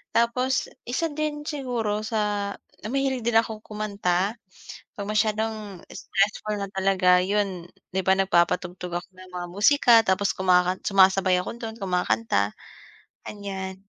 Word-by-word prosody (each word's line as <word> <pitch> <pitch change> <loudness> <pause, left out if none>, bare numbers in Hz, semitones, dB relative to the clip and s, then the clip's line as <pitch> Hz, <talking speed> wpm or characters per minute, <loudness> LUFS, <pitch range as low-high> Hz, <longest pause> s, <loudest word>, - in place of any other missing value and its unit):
Tapos 250 +3 +1 0.2
isa 290 +7 0
din 300 -1 -3
siguro 240 -8 -2
sa 210 -2 -1 0.3
na - - -4
mahilig 270 -3 0
din 225 -1 +4
akong 220 -1 -4
kumanta, 200 -1 -1 0.6
'pag 200 -1 -5
masyadong 215 -2 -1
stressful 210 +1 -1
na 200 - -3
talaga, 185 -2 +3
yun, 195 -3 -1 0.3
'di 190 - +2
ba 190 - +5
nagpapatugtog 180 -1 0
ako 180 - -15
ng 185 0 -13
mga 175 0 -4
musika 240 +5 +4
tapos 195 +1 +1
kumakan 180 0 +3
sumasabay 190 -1 +4
ako 180 - -5
dun, 225 -1 -5
kumakanta, 115 - 0 0.7
ganiyan. 190 -2 -6
200 Hz, 130 wpm, -25 LUFS, 185-220 Hz, 0.7 s, ba